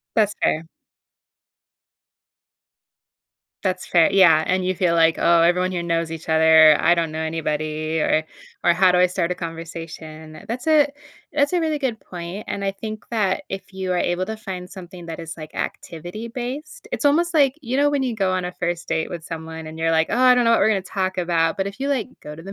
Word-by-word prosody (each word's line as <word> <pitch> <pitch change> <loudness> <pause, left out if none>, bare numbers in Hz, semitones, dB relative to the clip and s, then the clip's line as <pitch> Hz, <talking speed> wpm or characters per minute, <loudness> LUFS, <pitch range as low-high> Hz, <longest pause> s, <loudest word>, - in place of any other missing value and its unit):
That's 210 -2 +2
fair. 160 +2 +1 3.0
That's 185 -1 -1
fair 170 -3 +4
yeah, 165 -5 +6
and 185 0 +1
you 185 - 0
feel 175 -2 +1
like, 165 -1 +4
"Oh, 170 0 +4
everyone 180 +2 +3
here 175 -1 -2
knows 165 -1 -1
each 165 0 -8
other. 160 -1 +7
I 175 - +4
don't 165 -2 -1
know 155 +1 -5
anybody," 155 0 -2
or 155 0 +2 0.4
or, 175 - +4
"How 185 +1 +4
do 180 - +3
I 180 - +6
start 180 -1 -2
a - - 0
conversation?" 165 -2 -8
That's 245 +6 -5
a 305 -2 +5 0.4
that's 285 +3 +1
a 355 - +2
really 315 -2 0
good 255 -6 -2
point, 175 +3 -8
and 200 - -4
I 195 0 -1
think 215 +2 -7
that 205 -5 0
if 195 0 -7
you 190 -1 -3
are - - 0
able 175 +2 0
to 220 0 -4
find 185 -4 -7
something 180 -2 -11
that 165 0 -6
is, 165 -1 -7
like, 155 -1 -10
activity-based 235 - -6
it's 290 - 0
almost 340 +4 +2
like, 280 -5 +4
you 250 +2 -2
know, 290 +1 +4
when 285 -2 0
you 250 -3 -1
go 195 -3 0
on 185 -1 -1
a 180 - -4
1st 175 -1 -3
date 160 -1 -1
with 170 -3 -7
someone 160 -1 -7
and 160 +1 -9
you're, 165 0 +1
like, 160 0 +2
"Oh, - - 0
I 255 0 +6
don't 245 -1 +2
know 230 - +4
what 230 - +4
we're 205 - +4
gonna 200 -3 +1
talk 190 0 -3
about." 170 -2 +1
But, 195 0 -1
if 200 +6 -7
you, 280 - -1
like, 260 -4 -1
go 150 - -9
to 165 - -11
the 195 +3 -8
180 Hz, 220 wpm, -22 LUFS, 165-220 Hz, 3.0 s, other